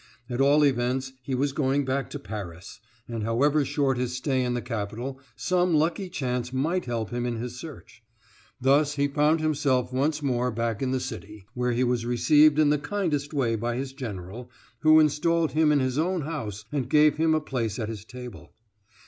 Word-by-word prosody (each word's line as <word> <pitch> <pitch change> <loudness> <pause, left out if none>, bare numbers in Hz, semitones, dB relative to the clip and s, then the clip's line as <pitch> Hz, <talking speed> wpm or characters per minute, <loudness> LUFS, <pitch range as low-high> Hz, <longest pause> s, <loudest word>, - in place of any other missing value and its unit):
At 120 +2 0
all 145 +2 +5
events, 130 0 0
he 130 +1 -3
was 140 +2 0
going 140 0 0
back 135 +1 -1
to - - -5
Paris, 95 -2 -8 0.3
and 115 -2 -4
however 140 +7 +2
short 135 -2 0
his 125 0 -2
stay 130 0 0
in 125 0 -1
the 120 - -2
capital, 115 +5 -4 0.2
some 175 +9 +1
lucky 170 +5 0
chance 125 -5 -2
might 160 +8 0
help 115 -3 -3
him 120 0 -2
in 120 -1 -2
his 120 +2 -6
search. 140 -6 -11 0.6
Thus 140 +3 +3
he 140 0 +2
found 150 +3 +2
himself 135 -5 +1
once 145 +3 0
more 125 -2 +1
back 115 -2 -2
in 130 - 0
the 130 0 0
city, 105 -5 -7
where 125 -1 0
he 120 +2 +1
was 120 -2 0
received 145 +5 +4
in 150 -1 +4
the 150 - +2
kindest 150 -5 -2
way 130 -7 0
by 120 +2 -2
his 135 +1 -4
general, 115 -2 -7 0.3
who 155 0 +6
installed 155 +2 +2
him 155 0 +3
in 145 - +4
his 130 +1 0
own 180 +2 0
house 110 -10 -5
and 135 -4 -2
gave 150 0 +5
him 160 0 +3
a - - +2
place 120 -8 -3
at 110 -3 -3
his 110 -3 -6
table. 125 +1 -10
130 Hz, 195 wpm, -26 LUFS, 120-150 Hz, 0.6 s, who